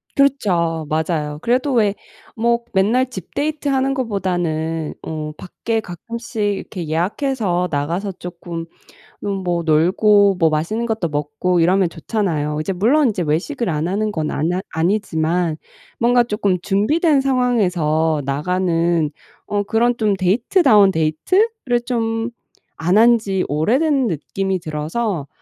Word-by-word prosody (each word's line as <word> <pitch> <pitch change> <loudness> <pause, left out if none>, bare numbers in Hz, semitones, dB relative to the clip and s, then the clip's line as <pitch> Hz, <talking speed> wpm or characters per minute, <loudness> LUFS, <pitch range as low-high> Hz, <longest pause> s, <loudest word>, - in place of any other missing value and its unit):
그렇죠. 180 - +1
맞아요. 155 -1 -1
그래도 255 +3 +1
왜 210 -4 +2 0.4
뭐 235 +1 +1
맨날 225 +7 +2
집 190 -8 -9
데이트 300 0 -2
하는 270 0 +1
것보다는 175 - -2
어 155 -1 -5
밖에 225 +5 -3
가끔씩 225 +5 -7
이렇게 195 -4 -2
예약해서 180 - 0
나가서 170 +7 -2
쪼끔 175 -2 -7 0.8
뭐 175 -1 -1
놀고 190 +5 +4
뭐 165 -3 +4
맛있는 175 +10 -1
것도 220 -7 -1
먹고 150 +4 -1
이러면 185 +1 +3
좋잖아요. 160 -5 -2
이제 190 +4 -2
물론 250 +9 +3
이제 195 -5 -1
외식을 175 - -1
안 155 +2 -1
하는 210 +2 -1
건 155 -3 -2
안하 175 +5 -1
아니지만 165 -2 0 0.4
뭔가 240 +1 +4
쪼끔 205 -5 0
준비된 275 - +2
상황에서 180 - +1
나가는 170 +1 0 0.4
어 205 0 0
그런 235 +3 +1
좀 215 -3 +1
데이트 225 - +2
다운 205 -6 +6
데이트?를 245 - +1
좀 225 -1 -1 0.5
안 185 +5 +4
한지 225 -5 +3
오래된 260 - +2
느낌이 190 +3 -2
들어서 155 - -3
190 Hz, 280 characters per minute, -19 LUFS, 165-230 Hz, 0.8 s, 다운